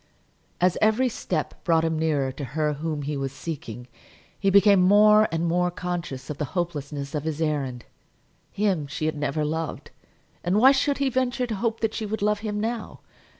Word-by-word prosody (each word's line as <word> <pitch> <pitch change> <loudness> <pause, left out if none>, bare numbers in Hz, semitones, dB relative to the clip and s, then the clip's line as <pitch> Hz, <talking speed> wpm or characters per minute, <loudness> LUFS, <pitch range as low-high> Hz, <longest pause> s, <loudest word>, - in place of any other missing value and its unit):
As 180 0 +2
every 220 +4 +3
step 175 -8 -4
brought 165 -2 +3
him 160 -1 -1
nearer 145 -4 +1
to 140 - -7
her 150 +3 -1
whom 150 0 -3
he 145 +1 -3
was 135 -1 -3
seeking, 135 -6 -7 0.5
he 195 - +2
became 200 0 +6
more 210 +3 +6
and 165 +1 -1
more 180 +1 +1
conscious 175 -7 -5
of 145 - -7
the 150 - 0
hopelessness 145 -5 -3
of 150 -2 -2
his 160 -1 -3
errand. 140 -6 -2 0.7
Him 195 -8 0
she 150 +2 -4
had 155 - 0
never 150 +1 -1
loved, 160 +1 -4 0.5
and 180 +3 +1
why 260 +5 +7
should 280 +1 +1
he 275 -1 +1
venture 255 0 0
to 235 - -4
hope 225 +2 -2
that 225 -1 0
she 215 - -3
would 210 0 -3
love 210 0 +2
him 210 -1 -3
now? 225 +1 -4
170 Hz, 190 wpm, -25 LUFS, 150-210 Hz, 0.7 s, why